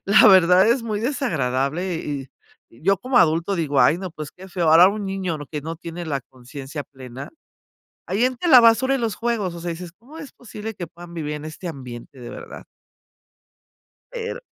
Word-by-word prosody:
la 200 +3 +6
verdad, 185 +1 +6
es 235 +1 +2
muy 215 -2 -2
desagradable, 170 - -1
y 140 -4 -5 0.4
yo 180 +12 +1
como 255 0 +1
adulto 170 +4 +2
digo: 145 -4 +1
"Ay 145 +7 +4
no, 185 -2 -5
pues, 155 -3 -7
qué 190 +1 -13
feo", 175 -3 +1
ahora 170 +3 +8
un 205 0 -3
niño 190 -4 -2
lo 145 - -8
que 150 +1 -5
no 165 +1 -5
tiene 170 +1 -7
la 140 -3 -2
conciencia 135 +3 -9
plena, 130 -1 -10 0.8
ahí 200 +6 0
entre 255 +7 -1
la 255 - +10
basura 245 +4 +4
y 270 - -2
los 225 -4 -1
juegos, 225 -7 -1
o 170 - -8
sea, 175 - -4
dices: 170 0 -7
"¿Cómo 260 - -15
es 295 -4 -9
posible 220 -2 -8
que 175 -3 -6
puedan 170 +1 -13
vivir 150 -3 -4
en 150 - -8
este 155 +3 -7
ambiente, 130 -3 -9
de 120 - -8
verdad?". - - -10 1.5
Pero 485 +1 -5
175 Hz, 195 wpm, -22 LUFS, 150-215 Hz, 1.5 s, la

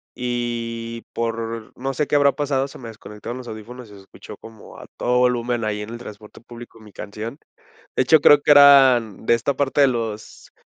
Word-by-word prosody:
y 115 -1 -4
por 115 -1 -4
no 135 +2 -4
sé 150 +2 -2
qué - - -1
habrá 140 -1 +4
pasado, 140 -2 -1
se - - -13
me 120 - -9
desconectaron 110 +2 -9
los 125 -1 -10
audífonos 115 +2 -10
y - - -15
se 100 - -13
escuchó 95 - -13
como 110 -2 -14
a - - -12
todo 125 0 0
volumen 120 -1 0
ahí 105 -1 -3
en 105 +2 -8
el 120 - -7
transporte 105 -3 -12
público 120 0 -13
mi 110 -1 -16
canción, 110 +6 -8 0.6
de - - +2
hecho, 155 +5 +5
creo 145 0 +6
que 150 - +2
eran 135 -7 +6
de - - +3
esta 120 +5 -2
parte 140 +1 0
de 140 - +6
los 115 -4 -5
120 Hz, 205 wpm, -21 LUFS, 110-130 Hz, 0.6 s, creo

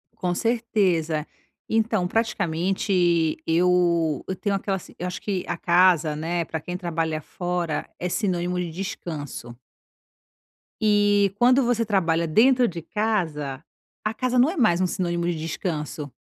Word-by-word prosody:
Com 180 -1 -1
certeza, 190 -10 0 0.4
então, 220 -4 +1
praticamente 175 -4 +1
eu 170 -2 +2
eu 190 - -2
tenho 200 0 -1
aquela 195 0 -1
s - - -12
eu 180 - -2
acho 180 - -5
que 195 -3 -2
a - - -2
casa, 170 -3 +3
né, 170 +3 -1
pra 160 - -4
quem 180 +4 -6
trabalha 165 -3 -2
fora 175 -1 -3
é 180 - -2
sinônimo 180 -2 -1
de 175 -2 -2
descanso 155 -8 -6 1.3
eh, 205 -2 +3
quando 250 +2 +5
você 235 -1 +1
trabalha 170 -5 +1
dentro 245 +8 +4
de 170 -2 -5
casa, 160 -9 -2 0.4
a 215 +1 -1
casa 255 +1 0
não 260 +6 +5
é 365 - -4
mais 185 - +3
um 185 - +2
sinônimo 175 -2 -2
de 175 -1 0
descanso 155 -3 -4
180 Hz, 145 wpm, -24 LUFS, 165-205 Hz, 1.3 s, quando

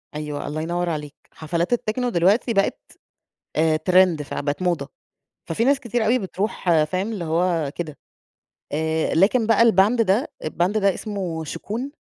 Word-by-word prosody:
أيوه، 150 -1 -4
الله 155 +2 -3
ينور 175 +2 -1
عليك. 150 -3 -4 0.2
حفلات 170 +6 -2
التكنو 245 +1 -1
دلوقتي 205 +5 +2
بقت 195 -1 +1 0.8
أ 155 0 +3
ترند 180 -1 +3
فبقت 145 +2 -3
موضة. 180 -2 0 0.6
ففي 230 - 0
ناس 275 +1 +3
كتيرة 240 -3 -1
أوي 240 +4 +3
بتروح 185 -5 0
فاهم؟ 185 +7 -2
اللي 195 -6 -4
هو 165 -2 0
كده. 160 -4 -5 0.8
آآ 160 +1 0
لكن 215 +7 +3
بقى 225 0 +4
الباند 225 +1 +4
ده 215 +7 +1
الباند 175 +6 0
ده 200 -2 +2
اسمه 185 -7 -4
شُكون. 220 - -5
180 Hz, 150 wpm, -22 LUFS, 160-220 Hz, 0.8 s, بقى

